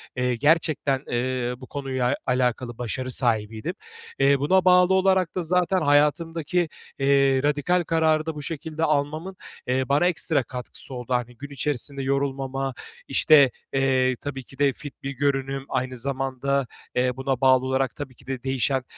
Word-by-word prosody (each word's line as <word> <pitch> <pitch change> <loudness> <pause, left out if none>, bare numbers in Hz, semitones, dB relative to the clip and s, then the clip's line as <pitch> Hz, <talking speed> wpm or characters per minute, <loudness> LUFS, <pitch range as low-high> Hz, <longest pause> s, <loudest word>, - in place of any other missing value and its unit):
eee, 125 -1 0
gerçekten, 145 -1 +2
eee, 125 0 -1
bu 130 0 -12
konuya 135 -2 -1
alakalı 125 -1 0
başarı 130 +2 -3
sahibiydim. 110 -3 0 0.5
Eee, 140 0 +4
buna 185 +7 +3
bağlı 180 0 +6
olarak 190 -2 +2
da 180 - -1
zaten 180 +2 +1
hayatımdaki, 160 +3 +1 0.3
eee, 135 -1 +3
radikal 150 +5 +1
kararı 160 -1 +2
da 160 -1 -4
bu 150 - -6
şekilde 160 +1 -5
almamın, 155 +5 -1 0.3
eee, 130 +1 0
bana 145 +5 +3
ekstra 160 -5 +1
katkısı 125 +2 -8
oldu. 125 0 -4
Hani, 125 -1 -2
gün 145 +3 -8
içerisinde 140 0 -2
yorulmama, 135 0 -1 0.3
işte, 145 -5 +5 0.2
eee, 130 -1 +2
tabii 135 -2 -5
ki 135 +2 -17
de 140 -1 +3
fit 145 +1 -11
bir 135 - -3
görünüm, 135 0 -1
aynı 130 0 -2
zamanda, 135 +1 -1 0.3
eee, 125 0 +2
buna 135 -1 -2
bağlı 130 -1 +5
olarak 130 -1 0
tabii 135 -3 -7
ki - - -21
de 130 -2 -4
değişen, 130 0 0
135 Hz, 155 wpm, -24 LUFS, 130-150 Hz, 0.5 s, bağlı